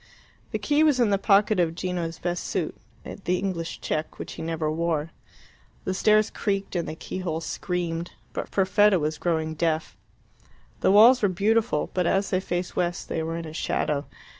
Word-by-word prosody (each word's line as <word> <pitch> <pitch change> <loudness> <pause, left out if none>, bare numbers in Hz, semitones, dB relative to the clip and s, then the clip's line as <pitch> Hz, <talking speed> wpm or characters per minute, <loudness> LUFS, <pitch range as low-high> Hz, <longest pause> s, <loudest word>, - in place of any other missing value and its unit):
The - - -2
key 295 +1 +2
was 295 -5 +4
in 230 -4 +3
the 200 - +2
pocket 205 0 +4
of 165 -2 +1
Gino's 175 -2 -3
best 175 0 -3
suit - - -2 0.3
the 180 -2 -2
English 175 -4 -3
check 155 +1 -3
which - - -7
he - - -8
never 160 -1 -1
wore. 160 -1 -1 0.7
The 185 - -1
stairs 215 +2 +3
creaked 195 -2 -2
and 170 -2 -1
the - - -5
key 185 - -6
hole 165 -3 -2
screamed; 170 0 -3 0.2
but - - -4
Perfetta 195 +1 +4
was 155 -1 -2
growing 160 -2 0
deaf. 160 0 -1 0.8
The - - +2
walls 230 +6 +7
were 205 - +3
beautiful, 220 +5 +1
but 180 -2 +1
as 195 +2 +1
they 185 - +2
faced 175 -1 -3
west 175 -1 -1
they 160 - -1
were 165 +1 -3
in 165 -2 -6
shadow. 150 -2 -1
175 Hz, 180 wpm, -26 LUFS, 165-195 Hz, 0.8 s, walls